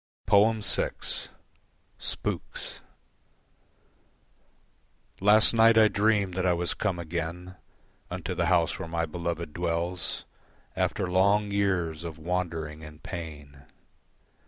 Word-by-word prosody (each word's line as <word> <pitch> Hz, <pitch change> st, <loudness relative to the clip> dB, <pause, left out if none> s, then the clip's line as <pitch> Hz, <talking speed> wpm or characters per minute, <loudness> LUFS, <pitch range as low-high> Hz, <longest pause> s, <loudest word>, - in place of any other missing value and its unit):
VI. 105 Hz, +2 st, +4 dB, 1.4 s
Spooks -, -, -3 dB, 2.4 s
Last 105 Hz, +4 st, +6 dB
night 115 Hz, 0 st, +6 dB
I 110 Hz, -1 st, +7 dB
dreamed 105 Hz, -3 st, +2 dB
that 95 Hz, 0 st, -1 dB
I 90 Hz, -1 st, +3 dB
was 85 Hz, 0 st, 0 dB
come 90 Hz, -, -1 dB
again 85 Hz, +2 st, -4 dB, 0.6 s
Unto -, -, -4 dB
the 85 Hz, -, 0 dB
house 85 Hz, -1 st, +2 dB
where -, -, -5 dB
my 85 Hz, 0 st, 0 dB
beloved 85 Hz, -1 st, -4 dB
dwells 85 Hz, +1 st, -2 dB, 0.5 s
After -, -, 0 dB
long 100 Hz, +3 st, +3 dB
years 90 Hz, -6 st, 0 dB
of 85 Hz, -2 st, -6 dB
wandering 80 Hz, -2 st, -3 dB
and 75 Hz, 0 st, -12 dB
pain. 75 Hz, -6 st, -8 dB
90 Hz, 105 wpm, -28 LUFS, 80-100 Hz, 2.4 s, I